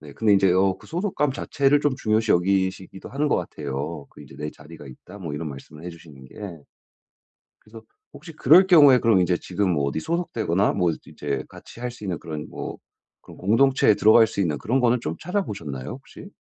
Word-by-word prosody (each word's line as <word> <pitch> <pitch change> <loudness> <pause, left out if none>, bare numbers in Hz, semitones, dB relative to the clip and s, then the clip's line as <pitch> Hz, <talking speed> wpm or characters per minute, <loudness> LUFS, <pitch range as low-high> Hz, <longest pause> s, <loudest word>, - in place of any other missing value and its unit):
네. 75 -2 -12
근데 110 +3 +2
인제 95 -2 +4
어 95 +1 +2
그 - - -17
소속감 170 -6 -1
자체를 140 +1 +1
좀 145 -3 +1
중요시 110 -2 0
여기시기도 95 +1 -1
하는 145 +3 -1
것 - - +2
같아요. 70 +2 -5
그 - - -16
인제 70 - -14
"내 75 +1 -4
자리가 75 0 -14
있다." 90 +10 -13
뭐 80 -6 -6
이런 75 +1 -4
말씀을 75 +3 -11
해주시는 80 -6 -11
게. - - -18 1.3
그래서 110 +1 -14 0.3
혹시 165 -2 -12
그럴 165 +6 +5
경우에 145 -8 +7
그럼 115 -6 +3
인제 90 0 +2
지금 95 +1 -2
뭐 70 -3 0
어디 70 +3 -2
소속되거나 110 - -1
뭐 90 -4 +1
즈 - - -7
이제 70 -2 -4
같이 120 - -14
할 125 0 -3
수 105 - -12
있는 90 -5 -3
그런 75 -2 -7
뭐 - - -7 0.4
그런 - - -14
공동체에 115 +4 +3
들어갈 110 +2 +5
수 100 - -5
있는 75 -6 0
그런 130 +4 0
거는 120 0 +2
좀 80 -6 -4
찾아보셨나요 100 - -4
혹시? 140 +8 -11
95 Hz, 400 characters per minute, -23 LUFS, 80-125 Hz, 1.3 s, 경우에